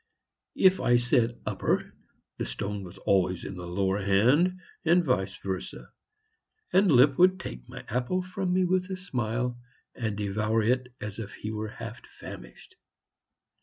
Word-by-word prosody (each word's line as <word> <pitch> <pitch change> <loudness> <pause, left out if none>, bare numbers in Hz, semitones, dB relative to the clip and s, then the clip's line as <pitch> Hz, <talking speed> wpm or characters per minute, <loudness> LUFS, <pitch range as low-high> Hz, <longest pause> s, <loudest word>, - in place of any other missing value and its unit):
If 190 0 +5
I 120 0 +4
said 120 -1 +1
"upper," - - -1 0.5
the - - -1
stone 100 +12 -4
was 90 +1 -10
always 95 -2 +1
in 100 - -6
the 90 -1 -7
lower 95 +3 0
hand, 125 - +3 0.2
and 170 +1 +4
vice 95 -8 0
versa. 95 -1 -6 0.8
And 190 0 +5
Lipp 130 +1 +5
would 185 +1 +5
take - - -8
my - - -9
apple 125 +11 -1
from 185 0 -3
me 185 0 +3
with 185 +1 +1
a 190 - -3
smile, 120 - -2 0.3
and 110 -4 -3
devour 105 +2 0
it 125 +2 +1
as 105 +1 -5
if 105 -2 -6
he 110 - -5
were 110 0 -3
half - - -8 0.2
famished. 60 0 -11
115 Hz, 155 wpm, -28 LUFS, -, 0.8 s, If